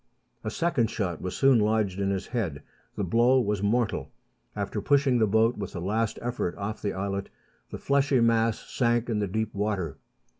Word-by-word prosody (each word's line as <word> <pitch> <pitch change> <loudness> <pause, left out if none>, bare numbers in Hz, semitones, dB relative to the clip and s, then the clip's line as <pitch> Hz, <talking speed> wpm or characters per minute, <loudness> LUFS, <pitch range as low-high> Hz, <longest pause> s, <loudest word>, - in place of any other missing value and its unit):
A 110 - -2
second 125 -3 +1
shot 90 -7 -3
was 90 - -4
soon 135 -3 +5
lodged 105 -3 +1
in 100 0 0
his 95 -1 -2
head. 90 - -3 0.3
The 105 - -2
blow 120 +8 +4
was 105 -4 0
mortal. 110 +2 0 0.4
After - - -3
pushing 140 -3 +3
the 110 - +3
boat 110 +3 +2
with 100 - -5
a - - -3
last 105 +5 -1
effort 120 -7 -2
off 105 +2 -4
the 100 - -2
islet, 100 +1 -3 0.4
the - - -6
fleshy 140 -1 +2
mass 115 -1 +3
sank 120 -1 +1
in 105 - 0
the 100 - 0
deep 110 +3 -2
water. 100 -7 -2
110 Hz, 185 wpm, -27 LUFS, 100-120 Hz, 0.4 s, soon